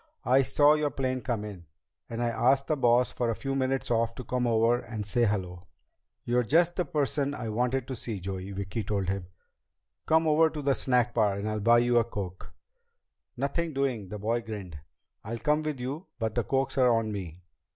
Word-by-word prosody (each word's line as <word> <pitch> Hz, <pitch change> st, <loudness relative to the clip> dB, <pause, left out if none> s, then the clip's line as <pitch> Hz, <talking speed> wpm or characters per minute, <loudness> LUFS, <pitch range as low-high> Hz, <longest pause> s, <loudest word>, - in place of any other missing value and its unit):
"I 130 Hz, +2 st, +5 dB
saw 145 Hz, +2 st, +4 dB
your 150 Hz, -1 st, +1 dB
plane 130 Hz, -1 st, -2 dB
come 110 Hz, -2 st, -2 dB
in, 95 Hz, -6 st, -9 dB, 0.4 s
and 115 Hz, +1 st, -3 dB
I 120 Hz, -, +1 dB
asked 135 Hz, +4 st, +2 dB
the 155 Hz, -, 0 dB
boss 125 Hz, -2 st, +3 dB
for 120 Hz, -, -1 dB
a 115 Hz, -, 0 dB
few 135 Hz, +3 st, -3 dB
minutes 135 Hz, -1 st, -1 dB
off 115 Hz, 0 st, +1 dB
to 130 Hz, -, -7 dB
come 125 Hz, 0 st, -1 dB
over 115 Hz, +1 st, +3 dB
and 110 Hz, -3 st, -6 dB
say 120 Hz, +3 st, +2 dB
hello." 90 Hz, -4 st, -2 dB, 0.6 s
"You're 120 Hz, +1 st, +2 dB
just 170 Hz, +8 st, +3 dB
the 180 Hz, -, 0 dB
person 145 Hz, -1 st, -1 dB
I 120 Hz, -4 st, -4 dB
wanted 125 Hz, +3 st, 0 dB
to 130 Hz, -, -4 dB
see, 110 Hz, -3 st, -4 dB
Joey," 95 Hz, +1 st, -5 dB
Vicki 100 Hz, +3 st, -4 dB
told 100 Hz, -2 st, -1 dB
him. 95 Hz, -2 st, -3 dB, 0.8 s
"Come 160 Hz, +1 st, +4 dB
over 160 Hz, +1 st, +5 dB
to 150 Hz, -2 st, -6 dB
the 140 Hz, 0 st, +3 dB
snack 125 Hz, -3 st, +1 dB
bar 105 Hz, -4 st, +2 dB
and 100 Hz, +1 st, -3 dB
I'll 110 Hz, 0 st, -1 dB
buy 115 Hz, +3 st, +5 dB
you 120 Hz, 0 st, +4 dB
a -, -, +3 dB
coke." 100 Hz, -5 st, -7 dB, 0.9 s
"Nothing 155 Hz, +5 st, -1 dB
doing!" 130 Hz, -8 st, -1 dB
The 105 Hz, -, -5 dB
boy 115 Hz, +3 st, -1 dB
grinned. 100 Hz, -9 st, -7 dB, 0.4 s
"I'll 115 Hz, +3 st, -4 dB
come 150 Hz, +5 st, +1 dB
with 155 Hz, -3 st, -3 dB
you, 140 Hz, +9 st, -5 dB
but 110 Hz, -3 st, -2 dB
the 120 Hz, -1 st, -1 dB
cokes 135 Hz, 0 st, 0 dB
are 125 Hz, -1 st, +5 dB
on 115 Hz, -2 st, +1 dB
me." 90 Hz, -4 st, -6 dB
120 Hz, 205 wpm, -28 LUFS, 105-135 Hz, 0.9 s, I